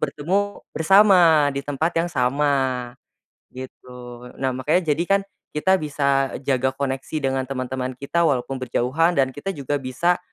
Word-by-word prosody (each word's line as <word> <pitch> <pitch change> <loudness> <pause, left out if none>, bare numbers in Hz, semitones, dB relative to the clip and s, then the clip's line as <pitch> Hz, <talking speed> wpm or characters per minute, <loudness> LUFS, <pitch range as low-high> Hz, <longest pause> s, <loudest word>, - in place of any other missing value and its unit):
bertemu 185 +8 -2
bersama 170 -4 +5
di 140 - -3
tempat 145 +4 -2
yang 170 - -2
sama, 140 0 0 1.1
gitu. 125 -1 -10
Nah, 130 -1 -1
makanya 150 +6 0
jadikan 175 +6 +1 0.3
kita 190 +5 +2
bisa 140 -3 0
e 130 - -8
jaga 130 -1 0
koneksi 135 +1 -4
dengan 135 -1 -1
teman-teman 130 -1 -4
kita, 165 +6 0
walaupun 135 -1 -1
berjauhan 130 +7 0
dan 135 -3 +2
kita 175 +8 -5
juga 145 +1 -2
bisa 155 +7 0
140 Hz, 140 wpm, -22 LUFS, 130-165 Hz, 1.1 s, bersama